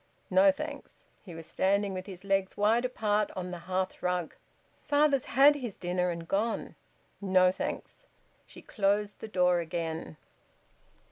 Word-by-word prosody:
"No, 290 +1 +6
thanks." 290 0 -8 0.2
He 175 -4 -10
was 165 0 -9
standing 200 +3 0
with 185 +1 -6
his 185 -2 -9
legs 195 -1 0
wide 225 +4 +3
apart 210 -4 0
on 180 -1 -4
the 175 - -6
hearth 185 0 -2
rug. 180 -2 -1 0.5
"Father's 290 -2 +2
had 275 +4 +6
his 250 -8 -6
dinner 180 0 -1
and 170 -1 -5
gone." 215 +5 -1 0.5
"No, 185 -2 +4
thanks." 190 - -6 0.4
She - - -14
closed 205 0 0
the - - -7
door 180 -3 +2
again. 160 - -4
195 Hz, 145 wpm, -29 LUFS, 180-220 Hz, 0.5 s, No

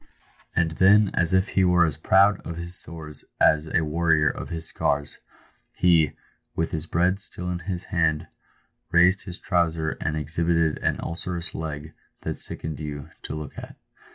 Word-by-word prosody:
And 85 -1 +2
then, 100 +5 +5
as 85 0 +1
if 95 +2 +2
he 95 - +2
were 90 -1 +5
as 80 -4 -2
proud 95 +4 +4
of 85 0 -7
his 85 +1 -7
sores 80 -4 -8 0.2
as 75 0 +4
a 85 - +1
warrior 80 -1 +2
of - - -7
his 80 -2 -5
scars, 70 -2 -1 0.5
he, 80 -4 +3 0.4
with 80 - -1
his 80 +1 -4
bread 90 +4 +1
still 90 -2 -3
in 90 - -3
his 90 0 -4
hand, 80 -2 0 0.7
raised 90 +3 +4
his 90 -1 -7
trouser 80 -3 0
and 80 0 -1
exhibited 80 +1 0
an - - 0
ulcerous 85 +1 -3
leg 80 -1 -5 0.3
that - - -3
sickened 80 -2 -3
you 75 0 -6
to - - -5
look 75 -1 -7
at. - - -10
85 Hz, 165 wpm, -25 LUFS, 80-90 Hz, 0.7 s, then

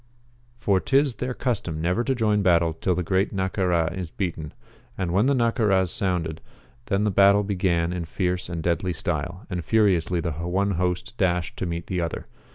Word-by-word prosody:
For 100 -5 +2
'tis 135 +1 +2
their 125 +1 -3
custom 95 - -2
never 90 +8 0
to 135 +1 0
join 105 -3 +2
battle 85 -3 +3
till 90 +3 -1
the 90 - -1
Great 95 +3 +1
Naccara 90 -3 0
is 90 -3 -5
beaten. 80 -5 -4 0.5
And 95 -3 -2
when 100 +7 +3
the 140 - +3
Naccaras 110 -7 +2
sounded, 85 -5 -1 0.5
then 100 +1 +1
the 105 - +1
battle 100 +1 +5
began 90 -4 0
in 90 -2 -3
fierce 90 +1 -2
and 85 -2 -4
deadly 90 +1 0
style, 90 +3 -3
and 90 -3 -4
furiously 95 -6 +2
the 85 0 -2
one 90 +6 -1
host 90 +6 -2
dashed 90 -3 0
to 95 - -2
meet 85 0 -4
the 90 -2 -2
other. 85 -2 -4
90 Hz, 180 wpm, -24 LUFS, 85-100 Hz, 0.5 s, battle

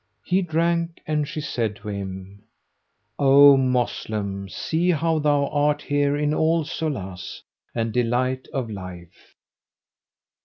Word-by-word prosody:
He 185 +2 +1
drank 170 0 0
and 150 -1 0
she 155 +1 -5
said 115 -7 -2
to 105 0 -12
him, 95 0 -6 0.8
"O 140 0 +8
Moslem, 110 -6 -1
see 165 - -1
how 165 -1 +1
thou 145 -1 +2
art 145 0 +1
here 145 0 +1
in 150 0 0
all 160 +1 +2
solace 110 - -5 0.3
and 115 -1 -1
delight 125 +2 0
of 135 -5 -2
life!" 90 -4 -10
140 Hz, 120 wpm, -23 LUFS, 105-155 Hz, 0.8 s, O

